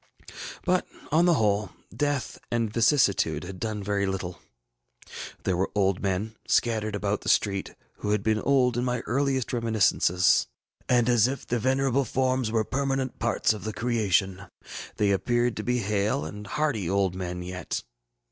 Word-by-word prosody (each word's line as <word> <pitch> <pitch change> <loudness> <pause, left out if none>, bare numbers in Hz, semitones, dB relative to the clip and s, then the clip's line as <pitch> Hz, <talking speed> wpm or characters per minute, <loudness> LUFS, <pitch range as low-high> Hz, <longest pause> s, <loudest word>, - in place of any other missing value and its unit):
But, 185 -1 +1 0.2
on 165 +3 +4
the 175 -2 +5
whole, 105 -4 +1 0.3
death 145 -3 -1
and 115 -2 -1
vicissitude 115 - +3
had 90 +1 -8
done 110 -2 -3
very 100 0 0
little. 90 -2 -4 1.0
There 95 - +1
were 95 +2 0
old 95 -2 +1
men, 100 +3 -2
scattered 110 -3 +1
about 105 0 -1
the - - -3
street, 100 -2 +1 0.2
who 105 - -4
had 105 -1 +1
been 110 -1 +2
old 125 -3 +2
in 120 - 0
my 125 -1 -1
earliest 135 -1 -1
reminiscences; 110 -6 +3 0.4
and, 120 -2 +4
as 120 -2 +4
if 135 +1 -4
their 120 - -1
venerable 130 +2 +2
forms 130 -1 0
were 110 -1 +2
permanent 135 -1 -2
parts 120 -1 +1
of 105 - -8
the 110 - -4
creation, 100 -5 0 0.5
they 105 -1 +2
appeared 120 +4 +1
to 105 - -3
be 125 +2 0
hale 100 -6 0
and 105 +6 -8
hearty 115 - -1
old 95 -1 +1
men 90 -1 -4
yet. 90 -1 -4
110 Hz, 160 wpm, -26 LUFS, 100-125 Hz, 1.0 s, the